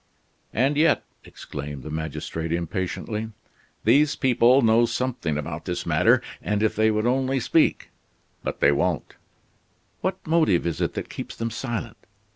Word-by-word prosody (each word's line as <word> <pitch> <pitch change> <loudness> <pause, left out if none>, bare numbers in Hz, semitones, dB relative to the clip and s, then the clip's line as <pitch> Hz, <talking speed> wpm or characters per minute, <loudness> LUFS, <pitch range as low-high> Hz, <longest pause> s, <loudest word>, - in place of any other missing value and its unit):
"And 135 +5 +1
yet," 155 0 +3 0.2
exclaimed 70 -2 -7
the 75 - -7
magistrate 80 +1 -4
impatiently, 95 +6 -3 0.5
"these 145 +6 +4
people 130 0 +4
know 115 +1 +4
something 120 - -2
about 75 +1 -5
this 90 -2 -3
matter, - - +3 0.2
and 105 0 -1
if 110 - +1
they 110 +1 +3
would 110 0 0
only 130 +2 +1
speak 130 +7 +1 0.3
" - - -41
"But - - -4
they - - +6
won't." 80 +2 -1 0.9
"What 185 0 -1
motive 160 - +3
is 85 -4 -2
it - - -1
that - - -5
keeps - - -7
them 115 0 -3
silent? 120 -1 -4
110 Hz, 150 wpm, -24 LUFS, 85-130 Hz, 0.9 s, they